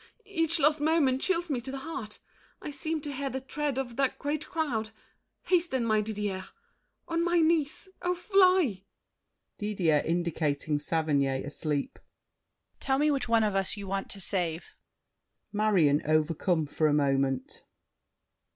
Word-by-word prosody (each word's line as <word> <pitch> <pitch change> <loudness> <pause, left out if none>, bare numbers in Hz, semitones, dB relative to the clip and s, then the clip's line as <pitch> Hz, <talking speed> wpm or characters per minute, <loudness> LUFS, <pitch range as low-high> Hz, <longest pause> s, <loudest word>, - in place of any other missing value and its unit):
Each 335 -5 0
lost 300 +1 +3
moment 295 -4 +2
chills 350 -2 0
me 270 -6 -2
to 260 - -8
the 275 - -4
heart. 270 -7 -6 0.4
I - - -6
seem 310 +2 -3
to 285 0 -5
hear 275 +1 -3
the 265 - -3
tread 275 +1 -3
of 245 -3 -4
that 275 -1 +1
great 300 +1 -3
crowd. 255 -10 -2 0.5
Hasten, 335 -9 +1
my 215 -1 +2
Didier—on 215 - -5
my 345 0 +2
knees—oh, 335 +3 0
fly! 365 - +3 0.8
DIDIER 185 -8 +1
(indicating 155 -3 -1
Saverny, 150 -2 +1
asleep). 140 +2 -3 0.8
Tell 265 -1 +2
me 300 +2 +3
which 270 -4 -1
one 230 -1 +4
of 210 -2 +1
us 195 +2 +1
you 200 - -6
want 195 0 -3
to 200 - 0
save. 175 -3 +1 0.8
MARION 190 -9 +3
(overcome 155 +2 +1
for 155 +2 0
a 150 - +2
moment). 135 -2 0
230 Hz, 140 wpm, -29 LUFS, -, 0.8 s, one